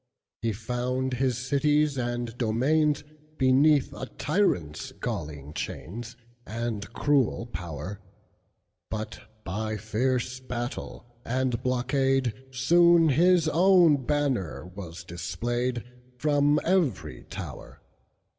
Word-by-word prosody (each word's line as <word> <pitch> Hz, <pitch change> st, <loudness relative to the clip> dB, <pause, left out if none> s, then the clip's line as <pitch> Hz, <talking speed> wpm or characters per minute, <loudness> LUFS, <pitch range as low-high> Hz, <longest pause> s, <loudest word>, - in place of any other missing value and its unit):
He 115 Hz, 0 st, 0 dB
found 125 Hz, +4 st, -2 dB
his 125 Hz, -1 st, +1 dB
cities 145 Hz, +3 st, +2 dB
and 120 Hz, -2 st, -2 dB
domainsBeneath 145 Hz, +2 st, +2 dB
a 130 Hz, -, -6 dB
tyrant's 125 Hz, -, -1 dB
galling 75 Hz, -1 st, -5 dB
chainsAnd 115 Hz, +1 st, -6 dB
cruel 135 Hz, -3 st, +1 dB
power; 85 Hz, -1 st, -6 dB, 0.9 s
But, 110 Hz, +1 st, -5 dB, 0.2 s
by 110 Hz, +3 st, -3 dB
fierce 125 Hz, +4 st, -1 dB
battle 120 Hz, -1 st, -5 dB, 0.2 s
and 125 Hz, -1 st, -1 dB
blockade, 130 Hz, 0 st, +1 dB, 0.2 s
Soon 165 Hz, +5 st, +5 dB
his 170 Hz, +3 st, +4 dB
own 170 Hz, -4 st, +5 dB
banner 135 Hz, -, 0 dB
was 90 Hz, -2 st, -9 dB
displayedFrom 125 Hz, -, -1 dB
every 170 Hz, -, 0 dB
tower. -, -, -8 dB
125 Hz, 85 wpm, -27 LUFS, 115-145 Hz, 0.9 s, Soon